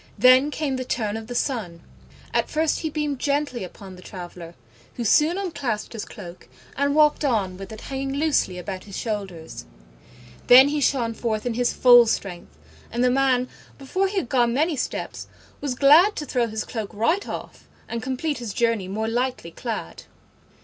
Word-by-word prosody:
Then 255 +3 +6
came 290 -3 -2
the 255 - -3
turn 220 -4 -2
of 225 0 -6
the 245 - -6
Sun. 205 - -2 0.5
At - - +1
first 315 0 0
he 315 - -2
beamed 295 -3 -2
gently 285 -5 -1
upon 185 +1 -10
the 180 - -13
traveller, 175 -2 -9 0.4
who 240 - -3
soon 305 - +3
unclasped 285 - -3
his 225 - -5
cloak 180 -4 -11 0.3
and 280 +1 +1
walked 300 0 +4
on 210 -9 0
with 195 +2 -9
it 220 - -9
hanging 270 0 -4
loosely 285 -11 +1
about 185 +1 -6
his 200 -2 -8
shoulders: 190 - -5 0.8
then 260 +3 +9
he 295 0 -1
shone 240 -5 +1
forth 220 -1 -2
in 245 - -1
his 245 +1 +1
full 245 -2 +7
strength, 185 - -4 0.3
and 240 +2 0
the 250 - +4
man, 255 -1 +2 0.3
before 370 +8 -1
he 395 +1 -4
had 375 - 0
gone 240 -2 +2
many 310 +3 +1
steps, 255 - -4 0.3
was 280 -3 -3
glad 310 +10 +6
to 300 - -4
throw 245 -4 0
his 220 -1 -3
cloak 220 -4 -5
right 320 - 0
off - - -8 0.2
and 235 - -4
complete 265 +4 -2
his 230 -5 -6
journey 230 -5 +1
more 215 +3 -2
lightly 245 -6 -2
clad. 225 +5 -6
245 Hz, 180 wpm, -24 LUFS, 210-280 Hz, 0.8 s, then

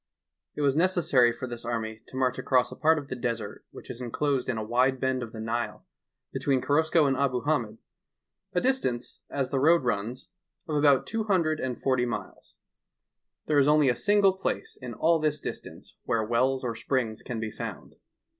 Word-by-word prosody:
It - - -3
was 140 -1 +2
neeessary 160 -8 +3
for 120 +2 -6
this 120 -2 -7
army 110 -2 -3
to - - -12
mareh 130 -1 0
aeross 125 -2 +2
a - - -7
part 160 +1 +3
of 145 -2 -5
the - - -3
desert 115 -4 -4
whieh - - -12
is 120 - -7
inelosed 130 +2 -1
in 120 - -1
a 110 - -2
wide 125 +4 +2
bend 130 0 0
of 115 -2 -6
the 110 - -8
Nile 115 +2 -3 0.5
between 135 -2 +1
Korosko 160 +3 +3
and 135 -1 +2
Abu 130 -2 0
Hamed, 120 -7 -1 0.7
a 180 - +1
distanee, 180 - -1
as 135 -2 -2
the 135 - +1
road 160 +2 +4
runs, 115 +1 -2 0.4
of 155 - -2
about 145 -2 +4
two 225 -1 -2
hundred 165 -7 +1
and 125 -2 -3
forty 130 -2 +1
miles. 120 - -7 0.9
There 150 -2 +3
is 140 - +4
only 150 -2 +5
a 125 - +2
single 205 - +3
plaee 190 - -3
in 120 -3 -6
all 165 +5 +3
this 150 -1 0
distanee - - -8
where 115 -1 +1
wells 130 +4 +1
or 120 -2 -1
springs 115 -1 -2
ean 120 -2 -2
be 110 -1 -3
found. - - -7
130 Hz, 190 wpm, -27 LUFS, 120-150 Hz, 0.9 s, only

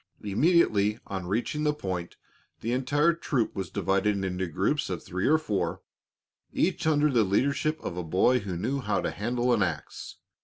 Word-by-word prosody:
Immediately 105 - +3
on 95 -2 -5
reaching 120 +9 -1
the 150 -1 +1
point, 90 -9 -5 0.4
the 115 - -2
entire 145 +6 +2
troop 135 -8 -1
was 95 -3 -4
divided 100 +1 0
into 95 0 -2
groups 95 - 0
of 90 -3 -4
three 95 +1 -2
or 155 - +5
four, 105 - -2 0.7
each 175 -2 0
under 150 -1 +3
the 120 -4 +4
leadership 140 +10 +1
of 85 - -4
a 90 - -2
boy 95 +10 +3
who 95 -5 -5
knew 130 +10 -1
how 105 -5 0
to - - -2
handle 120 +4 0
an 115 - +2
ax. 95 - -3
110 Hz, 170 wpm, -27 LUFS, 95-145 Hz, 0.7 s, or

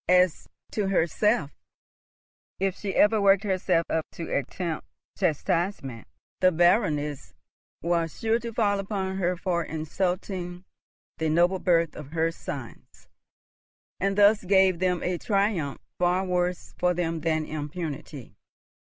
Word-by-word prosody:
As 180 -2 +3 0.2
to 210 -3 -1
herself, 180 -2 +1 1.1
if 195 -1 0
she 200 -2 -4
ever 210 0 +4
worked 195 0 +5
herself 185 -4 +1
up 160 -1 -1
to 165 - -4
attempt 160 +4 -3 0.3
chastisement, 170 - -1 0.3
the 185 0 +5
Baroness 150 - +1 0.5
was 170 -2 0
sure 225 +1 +2
to 235 -1 -5
fall 205 -3 +1
upon 190 -1 -3
her 180 -1 0
for 170 -1 -1
insulting 180 +3 -3 0.5
the 160 -1 +1
noble 175 +4 +3
birth 170 -3 +2
of 150 0 -9
her 165 0 +1
sons, 135 -7 -9 0.9
and 195 +1 0
thus 205 +1 +5
gave 190 -2 +4
them 180 -1 0
a 180 -1 -1
triumph 195 -9 0 0.2
far 180 +2 +2
worse 180 -1 -1
for 180 0 +2
them 165 -1 -1
than 160 -2 0
impunity. 150 - -6
180 Hz, 125 wpm, -26 LUFS, 160-195 Hz, 1.1 s, worked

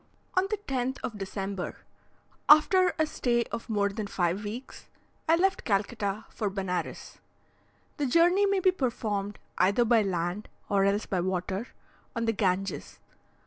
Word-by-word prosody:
On 370 +1 +2
the 430 - 0
10th 265 -8 -2
of 215 -3 -4
December, 195 -1 -4 0.7
after 360 +4 +6
a 315 - +3
stay 240 -5 0
of 235 0 -5
more 205 -2 +2
than 205 +1 -4
five 185 +1 0
weeks, 225 +6 -7 0.4
I 325 - +7
left 380 +2 +1
Calcutta 205 0 -1
for 210 - -2
Benares. 190 -2 -4 0.8
The 290 -3 0
journey 350 +8 +4
may 395 -1 +2
be 370 - +5
performed 215 - -2 0.2
either 200 +6 +4
by 230 -1 +5
land, 180 +1 -2 0.2
or 200 -2 +3
else 200 +2 +1
by 185 - -1
water, 190 +4 -2 0.5
on 230 0 -1
the 225 - +2
Ganges. 195 -1 -1
215 Hz, 145 wpm, -28 LUFS, 195-270 Hz, 0.8 s, I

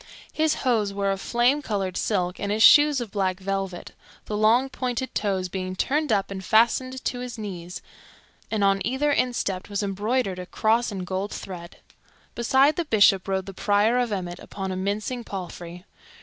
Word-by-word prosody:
His 315 0 +1
hose 220 -5 +2
were 200 0 -1
of 195 0 -3
flame 245 +5 +2
colored 195 -7 -2
silk, 180 -4 -1
and 200 - -2
his 215 +1 +2
shoes 295 +1 +7
of 230 -4 -6
black 190 -2 -1
velvet, 195 -2 -4 0.3
the 210 - -4
long, 225 +5 +4
pointed 260 -1 -3
toes 190 -3 -1
being 185 0 -4
turned 295 +8 0
up 200 -2 +1
and 190 -1 -5
fastened 255 +5 +2
to 245 - -2
his 250 -1 -6
knees, 180 -5 -7 0.7
and 215 -2 0
on 195 0 +3
either 265 +5 0
instep 220 -9 -1
was 205 0 -2
embroidered 200 0 -1
a 180 - -7
cross 225 +4 +1
in 190 -2 -4
gold 190 +3 -3
thread. 175 -2 -8 0.6
Beside 265 +5 +3
the 345 - -1
Bishop 200 -6 +4
rode 190 -1 -1
the 195 - -8
Prior 210 +5 +2
of 245 -2 0
Emmet 180 -3 -4
upon 190 -1 -6
a - - -3
mincing 205 +6 -2
palfrey. 180 -2 -8
205 Hz, 180 wpm, -25 LUFS, 190-245 Hz, 0.7 s, shoes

